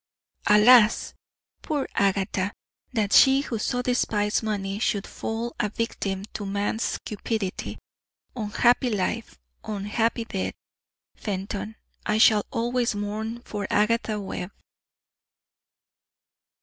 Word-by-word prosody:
"Alas! 215 +1 +6 0.5
poor 290 -3 -2
Agatha! 195 0 +1 0.4
That 215 -5 0
she, 270 0 +7
who 235 -6 -4
so 245 +3 -1
despised 215 -4 +1
money, 205 -2 -2
should 205 -2 0
fall 230 +2 -4
a 210 - +1
victim 200 -3 -3
to 210 - -4
man's 205 +3 -1
cupidity! 210 -2 -3 0.6
Unhappy 240 +3 +2
life, 215 +2 -2 0.3
unhappy 220 +3 -1
death! 195 -4 -3 0.6
Fenton, 200 +1 -4 0.3
I 215 - +1
shall 215 -1 +5
always 240 -1 0
mourn 215 +3 -4
for 205 -2 -4
Agatha 215 0 +1
Webb." 190 -2 -5
215 Hz, 100 wpm, -25 LUFS, 205-230 Hz, 0.6 s, she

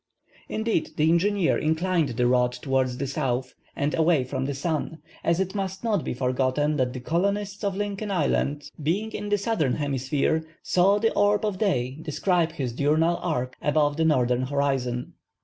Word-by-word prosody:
Indeed, 220 -6 -1
the 155 +1 +4
engineer 190 +1 +2
inclined 160 0 +1
the 125 - +2
rod 125 0 +3
towards 130 -1 -1
the 140 - -2
south 130 -2 -2 0.2
or 140 - +1
away 160 -4 +3
from 130 +1 -3
the 140 0 -2
sun, 160 +2 -2 0.3
as 170 +1 +2
it 190 -1 -1
must 195 -1 -4
not 210 -7 +1
be - - -3
forgotten 130 +4 0
that 125 -2 0
the 130 - -5
colonists 200 - -1
of 200 -2 0
Lincoln 205 0 -3
Island, 145 -5 0
being 195 +9 -1
in 205 - -5
the 205 - +3
Southern 200 - 0
Hemisphere, 145 +2 0 0.2
saw 190 +3 +3
the 225 +2 +1
orb 205 +1 +2
of 200 -3 -2
day 135 - 0
describe 165 +1 0
his 130 -6 -3
diurnal 155 +6 +2
arc 130 -7 -2
above 145 0 +2
the 160 - +2
northern 125 -5 +2
horizon. 130 -2 -1
155 Hz, 170 wpm, -25 LUFS, 130-190 Hz, 0.3 s, the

